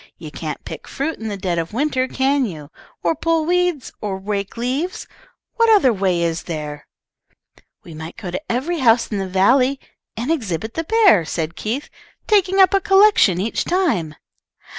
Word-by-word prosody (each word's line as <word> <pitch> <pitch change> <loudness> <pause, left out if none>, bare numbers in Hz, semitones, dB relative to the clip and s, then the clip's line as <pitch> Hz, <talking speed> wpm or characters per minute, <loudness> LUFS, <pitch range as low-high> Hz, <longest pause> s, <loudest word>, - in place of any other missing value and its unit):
You - - -9
can't - - -6
pick - - -8
fruit 305 +4 -3
in 220 - -5
the 205 -2 -4
dead 180 -3 -1
of 165 +4 -5
winter, 260 0 0
can 270 0 +1
you? 155 -5 -9 0.3
or 170 -1 +2
pull 330 - 0
weeds, 355 -5 0
or 200 -2 -3
rake 200 +1 -4
leaves? 265 +10 -2 0.5
What 460 -1 +4
other 390 - +5
way 185 -4 0
is 165 0 -2
there?" 150 -2 -5 1.0
"We 165 - -11
might 160 +1 -9
go 190 -6 -6
to 230 - -4
every 300 +8 -1
house 230 -2 +4
in 205 - -1
the 190 - -3
valley, 250 +8 +3 0.4
and 240 +7 -2
exhibit 220 - -2
the 325 - -3
bear," 415 - +5
said 160 0 -4
Keith, 240 +7 -3 0.4
"taking 390 -2 +2
up 380 0 +6
a 390 - +3
collection 390 - +5
each 215 +4 -1
time." 235 - 0
235 Hz, 175 wpm, -20 LUFS, -, 1.0 s, up